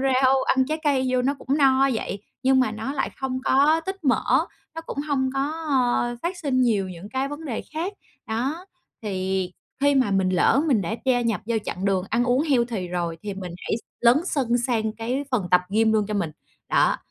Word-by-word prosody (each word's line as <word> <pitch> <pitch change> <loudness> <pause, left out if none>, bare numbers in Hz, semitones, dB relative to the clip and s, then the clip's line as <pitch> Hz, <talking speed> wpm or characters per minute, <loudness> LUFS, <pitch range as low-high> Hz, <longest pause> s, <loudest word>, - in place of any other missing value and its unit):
rau, 265 0 +3
ăn 260 0 +2
trái 310 +2 -2
cây 270 -3 +2
vô 250 -1 +2
nó 275 +3 +1
cũng 270 +2 -1
no 270 -1 +4
vậy 205 -3 -4 0.2
nhưng 265 0 +4
mà 255 - +2
nó 220 +5 -4
lại 275 - -1
không 260 -1 -2
có 295 +5 +4
tích 385 -2 -5
mỡ, 260 - +2 0.3
nó 325 - -4
cũng - - -6
hông 265 -2 +1
có, 270 - 0 0.3
ờ, 245 -3 +1
phát 350 +2 -2
sinh 280 -7 0
nhiều 210 -6 +1
những 180 +2 -9
cái 265 +4 -2
vấn 290 +3 -7
đề 250 -7 -3
khác. 340 +6 -2 0.3
Đó, 270 +11 -2 0.4
thì 190 -2 -2 0.3
khi 285 0 +4
mà 260 -6 +3
mình 190 -1 +2
lỡ 185 +9 +3
mình 245 -8 +3
đã 185 +5 -2
gia 255 -2 +3
nhập 230 -3 0
vô 230 0 0
chặng 185 - -4
đường 190 -2 +1
ăn 235 +2 +2
uống 250 +3 +2
healthy 235 - 0
rồi 175 -2 -2
thì 205 -1 -4
mình 185 -3 -6
hãy - - -2
s - - -8 0.2
lấn 240 +1 +6
sân 250 -8 +1
sang 230 -3 0
cái 245 +5 -2
phần 230 -8 0
tập 180 - +6
gym 220 +2 +3
luôn 215 -2 +2
cho 210 - -2
mình. 175 -6 -1 0.4
Đó, - - +3
250 Hz, 215 wpm, -24 LUFS, 210-270 Hz, 0.4 s, lấn